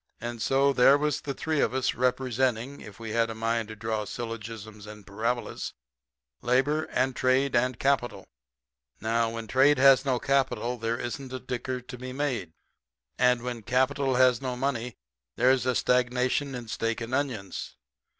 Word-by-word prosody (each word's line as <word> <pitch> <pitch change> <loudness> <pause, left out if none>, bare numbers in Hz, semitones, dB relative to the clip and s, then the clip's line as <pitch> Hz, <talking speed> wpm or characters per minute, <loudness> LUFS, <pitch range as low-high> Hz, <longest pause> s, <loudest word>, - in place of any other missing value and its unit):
And 120 -1 -5
so, 135 +3 +3
there 135 +2 +6
was 150 0 -1
the 140 -2 -4
three 155 +1 -1
of 130 - +1
us, 130 0 +1
representing, 125 0 0
if 105 -1 -12
we 110 -1 -6
had 115 0 +1
a 115 - -5
mind 115 0 -1
to 110 - -8
draw 110 0 -2
syllogisms 110 -2 -7
and 105 -1 -11
parabolas, 115 +5 -3 0.7
labor 135 +6 +2
and 130 +1 0
trade 130 +1 +2
and 125 0 +2
capital. 120 -8 0 0.7
Now, 115 +1 +1
when 115 0 -5
trade 135 +5 +4
has 135 0 +6
no 130 -3 +1
capital 125 -1 0
there 115 +1 -1
isn't 130 +2 -5
a 130 - -4
dicker 125 0 -4
to 125 +1 -10
be 130 0 -6
made. 130 - -2 0.7
And 125 -1 +3
when 120 -2 -4
capital 130 +3 +1
has 125 -1 +4
no 130 -2 -3
money 125 -3 -2 0.4
there's 130 0 +3
a 125 - +2
stagnation 125 +3 +1
in 120 -2 -7
steak 115 +1 -2
and 115 +1 -6
onions. 115 - -3
125 Hz, 165 wpm, -27 LUFS, 115-130 Hz, 0.7 s, there